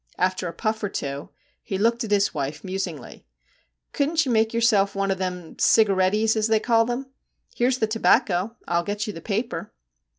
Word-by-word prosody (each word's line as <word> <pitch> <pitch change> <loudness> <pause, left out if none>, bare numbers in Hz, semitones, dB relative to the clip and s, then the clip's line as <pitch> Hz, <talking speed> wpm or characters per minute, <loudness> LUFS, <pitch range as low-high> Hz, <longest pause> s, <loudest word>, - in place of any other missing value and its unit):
After 185 0 0
a - - -4
puff 220 +5 -2
or 205 - 0
two 140 -6 -5 0.3
he 195 - -4
looked 230 +4 +1
at 225 - -5
his 205 -1 +2
wife 145 +1 -4
musingly. 185 -7 -6 0.7
'Couldn't 315 +2 +1
you 260 - -1
make 220 -1 +2
yourself 220 -4 +2
one 195 0 0
of 190 - -2
them 180 -3 -5
cigarettys, 210 +1 +3
as 215 0 +1
they 220 -1 +3
call 230 +1 +2
'em. 265 +2 -5 0.4
Here 245 +1 +1
's 255 - 0
the 225 - +1
tobacco, 220 -1 +3
and 225 - -10 0.2
I - - -3
'11 170 - 0
get 205 +1 -2
you 210 - -5
the 165 - -9
paper.' 215 +6 -3
210 Hz, 200 wpm, -24 LUFS, 185-230 Hz, 0.7 s, cigarettys